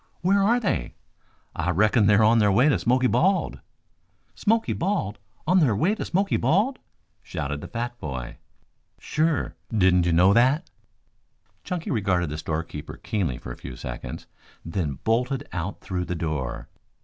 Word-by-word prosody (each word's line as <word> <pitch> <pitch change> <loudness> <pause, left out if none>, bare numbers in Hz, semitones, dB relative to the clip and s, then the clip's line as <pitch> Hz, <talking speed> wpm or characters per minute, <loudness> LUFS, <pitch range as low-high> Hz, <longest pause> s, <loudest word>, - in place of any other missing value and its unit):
"Where 195 +3 +3
are 230 +5 +3
they?" 175 - -2 0.6
"I 85 +1 -1
reckon 105 +4 +3
they're 105 +1 +5
on 115 +2 +5
their 105 -2 +4
way 125 +9 +4
to 150 - +3
Smoky 130 +2 +2
Bald." 190 +9 +2 0.7
"Smoky 225 +1 +1
Bald? 170 - -2 0.3
On 180 +3 +4
their 130 - +3
way 175 - +2
to 220 - -4
Smoky 195 +3 +1
Bald?" 200 - +1 0.4
shouted 75 +1 -4
the - - -7
fat 120 +1 -4
boy. 65 -5 -6 0.6
"Sure. 155 -2 0 0.2
Didn't 90 -5 +3
you - - +2
know 90 +4 +5
that?" 130 - +3 0.9
Chunky 180 -3 -4
regarded 95 - 0
the 75 - -4
storekeeper 80 -1 -5
keenly 85 - -2
for - - -8
a - - -8
few 65 - -8
seconds, - - -7 0.4
then 80 -5 -2
bolted 125 +5 0
out 90 +3 -4
through 90 -2 -3
the 90 - -3
door. 75 -7 -3
110 Hz, 155 wpm, -25 LUFS, -, 0.9 s, they're